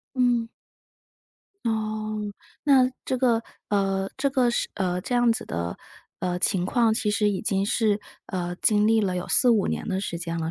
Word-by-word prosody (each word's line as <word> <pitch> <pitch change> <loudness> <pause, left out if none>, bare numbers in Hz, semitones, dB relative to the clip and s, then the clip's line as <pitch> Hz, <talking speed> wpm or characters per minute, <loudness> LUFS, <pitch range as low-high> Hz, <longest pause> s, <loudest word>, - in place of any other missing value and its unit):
嗯。 245 -2 +2 1.2
哦， 215 -1 -2 0.5
那 260 -3 +5 0.2
这 260 - 0
个 240 -3 +2 0.3
呃， 195 -1 0
这 275 +1 +2
个 255 -3 +2
是 235 - -1
呃， 180 -2 -1
这 245 - -3
样 240 -1 +4
子 - - -5
的， 85 +1 -4 0.4
呃， 180 -1 -1
情 180 0 +1
况， 230 0 +3
其 220 -1 0
实 210 0 +2
已 195 - -2
经 195 -2 0
是， 215 -1 +2 0.3
呃， 175 -2 -3
经 210 -1 +3
历 225 0 +4
了 190 -3 0
有 180 - -3
4-5 235 -6 +4
年 - - -3
的 190 -2 0
时 170 -3 -3
间 170 -1 -4
了， 160 0 -2
215 Hz, 185 characters per minute, -25 LUFS, 185-235 Hz, 1.2 s, 那